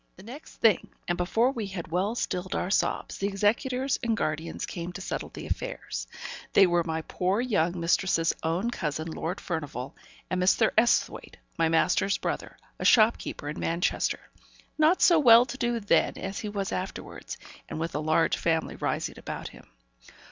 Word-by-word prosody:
The 190 - -14
next 255 +8 -11
thing, 220 -5 +3 0.2
and 175 - +1
before 225 +8 +2
we 225 -6 -4
had 180 -4 -7
well 195 +6 0
stilled 185 -5 -2
our 180 - -1
sobs, - - 0
the 195 - 0
executors 245 +7 0
and 230 -2 0
guardians 155 -1 -2
came 175 0 -5
to 195 - -7
settle 190 - -4
the - - -9
affairs. - - -4 0.5
They 195 - +7
were 175 -1 +2
my 160 -1 -3
poor 185 +6 0
young 185 -8 +1
mistress's 170 0 +2
own 175 +9 0
cousin, 160 -5 -3
Lord 170 +4 -4
Furnivall, 145 -6 -4 0.3
and 185 0 -1
Mr. 195 +4 +4
Esthwaite, 235 +2 +1 0.2
my 165 -2 +2
master's 165 +4 +2
brother, - - -4 0.2
a - - -4
shopkeeper 220 -9 +3
in 150 - -4
Manchester; 170 +2 0 0.6
not 315 +4 +4
so 340 -3 +6
well 240 -3 +8
to 245 +1 -6
do 240 -1 0
then 205 - +2
as 195 +2 -4
he 210 - -4
was 200 -2 -3
afterwards, 185 +1 -5 0.3
and - - -5
with 165 +1 -3
a 150 - -1
large 155 +1 +2
family 165 -1 0
rising - - -2
about - - -6
him. - - -16
190 Hz, 170 wpm, -27 LUFS, 165-230 Hz, 0.6 s, well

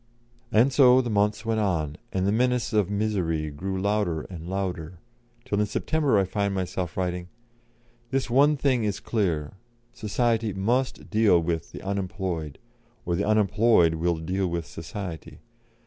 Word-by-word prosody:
And 120 +5 +4
so 130 -2 +7
the 120 -3 -1
months 105 +1 +1
went 115 -1 0
on, 80 -8 0 0.2
and 95 0 0
the 100 - +2
menace 125 +1 +1
of 105 -3 +2
misery 90 -7 -1
grew 95 +6 -4
louder 100 -5 0
and 85 -1 -7
louder, 90 -3 -3 0.5
till 100 - -1
in 105 - +2
September 145 +3 +1
I 100 - +4
find 100 +1 -1
myself 90 -3 -3
writing: 90 -1 -2 0.8
"This 135 +1 0
one 140 +5 +4
thing 130 -4 +1
is 105 -2 -1
clear 85 -9 -1 0.4
Society 115 0 0
must 120 +7 -1
deal 105 -5 +4
with 85 -1 -2
the - - -9
unemployed, 95 -6 -3 0.5
or 85 - 0
the 100 - 0
unemployed 105 -4 +4
will 85 +1 0
deal 95 +4 -1
with 85 -1 -3
Society. 85 +2 -7
100 Hz, 150 wpm, -26 LUFS, 85-110 Hz, 0.8 s, so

